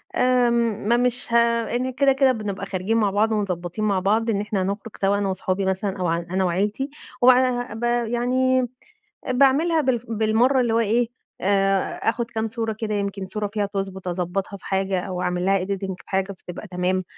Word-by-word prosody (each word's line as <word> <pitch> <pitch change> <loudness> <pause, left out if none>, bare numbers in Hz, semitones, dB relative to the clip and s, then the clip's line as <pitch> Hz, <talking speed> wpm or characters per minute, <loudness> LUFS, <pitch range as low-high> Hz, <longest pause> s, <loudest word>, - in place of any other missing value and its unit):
آمم، 235 -4 +2
ما 235 - +5
مش 245 -1 -1
ه - - +4 0.4
إن 255 +1 -1
كده 275 0 +3
كده 270 -1 +4
بنبقى 205 -4 -4
خارجين 195 +3 -1
مع 210 -3 +3
بعض 215 +3 +2
ومضبطين 190 -1 -2
مع 200 -3 +2
بعض 220 +5 +1
إن 200 -3 +1
إحنا 210 -2 -2
هنخرج 200 +3 -4
سوا 200 +1 +2
أنا 200 -1 0
وصحابي 190 +1 -1
مثلًا 190 +1 -1
أو 180 - 0
ع 165 0 +1
أنا 180 +3 -2
وعيلتي، 205 +9 0 0.3
و - - +4
بعدها 250 -2 +4
بقى 240 0 -1
يعني 255 +1 +2 0.6
باعملها 280 +6 +4
بالف 255 -5 0
بالمرّة 225 +4 +2
اللي 240 -2 +1
هو 230 - +3
إيه 230 +2 +2 0.3
آآ 195 0 +1
آخد 235 +1 -1
كام 225 -2 -2
صورة 225 0 -2
كده 215 0 -3
يمكِن 200 -1 -2
صورة 210 +2 -3
فيها 210 -2 0
تضبط 195 -2 -4
أضبطها 180 +3 -3
في - - -15
حاجة 190 -1 0
أو 180 0 -4
أعمل 180 0 -1
لها 195 -1 +2
editing 195 0 -3
بحاجة 190 +1 -1
فتبقى 180 +2 -9
تمام. 185 +1 -1
210 Hz, 190 wpm, -23 LUFS, 190-240 Hz, 0.6 s, ما